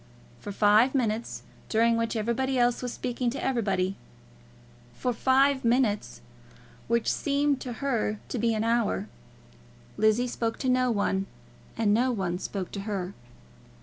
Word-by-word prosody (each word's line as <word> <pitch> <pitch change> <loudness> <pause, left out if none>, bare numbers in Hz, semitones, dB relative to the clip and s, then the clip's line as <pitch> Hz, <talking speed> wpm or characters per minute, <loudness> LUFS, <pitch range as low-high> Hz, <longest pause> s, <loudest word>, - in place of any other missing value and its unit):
For - - -7
five 215 +6 +4
minutes, 230 -3 -1 0.3
during 230 +1 +3
which 230 0 -1
everybody 235 +4 0
else 240 0 +2
was 250 -1 -3
speaking 245 0 -2
to 260 - -5
everybody, 195 -7 0 1.0
for 250 - -1
five 265 +3 +3
minutes, 230 - +1 0.7
which 235 0 +1
seemed 285 -1 0
to 250 - -5
her 225 -5 0
to 250 - -3
be 230 0 +1
an 215 - 0
hour, 225 - 0 0.9
Lizzie 215 +3 +3
spoke 230 -2 -2
to 260 - -1
no 255 0 +3
one, 195 -3 0 0.5
and 215 -2 +2
no 250 +4 +2
one 185 -6 -2
spoke 190 -2 -5
to 200 - -5
her. 195 -2 -4
230 Hz, 145 wpm, -27 LUFS, 210-250 Hz, 1.0 s, five